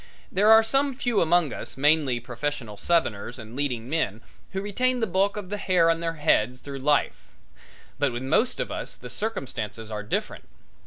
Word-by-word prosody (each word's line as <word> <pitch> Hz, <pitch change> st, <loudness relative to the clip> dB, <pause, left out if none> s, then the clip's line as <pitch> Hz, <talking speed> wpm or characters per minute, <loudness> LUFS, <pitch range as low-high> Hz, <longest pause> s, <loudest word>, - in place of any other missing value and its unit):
There 205 Hz, +3 st, +3 dB
are 220 Hz, 0 st, +8 dB
some 270 Hz, +4 st, +1 dB
few 245 Hz, -4 st, +1 dB
among 170 Hz, -3 st, +3 dB
us, -, -, -7 dB
mainly 145 Hz, -3 st, +3 dB
professional 120 Hz, -2 st, -4 dB
Southerners 120 Hz, -3 st, 0 dB
and 110 Hz, 0 st, -10 dB
leading 125 Hz, -5 st, -2 dB
men, 120 Hz, -8 st, -1 dB, 0.3 s
who 190 Hz, -, -3 dB
retain 250 Hz, +6 st, 0 dB
the 225 Hz, -, +2 dB
bulk 195 Hz, +1 st, +1 dB
of 200 Hz, -3 st, -6 dB
the 205 Hz, -, -1 dB
hair 180 Hz, -4 st, +3 dB
on 165 Hz, -, -1 dB
their 165 Hz, 0 st, -2 dB
heads 130 Hz, -5 st, +2 dB
through 140 Hz, -1 st, -7 dB
life; 145 Hz, +2 st, +1 dB, 0.7 s
but 145 Hz, -3 st, +2 dB
with 120 Hz, +2 st, -4 dB
most 215 Hz, -, +1 dB
of -, -, -2 dB
us -, -, -5 dB
the -, -, -10 dB
circumstances 115 Hz, -, -4 dB
are 105 Hz, -1 st, -3 dB
different. 105 Hz, -, -3 dB
155 Hz, 180 wpm, -26 LUFS, 125-200 Hz, 0.7 s, are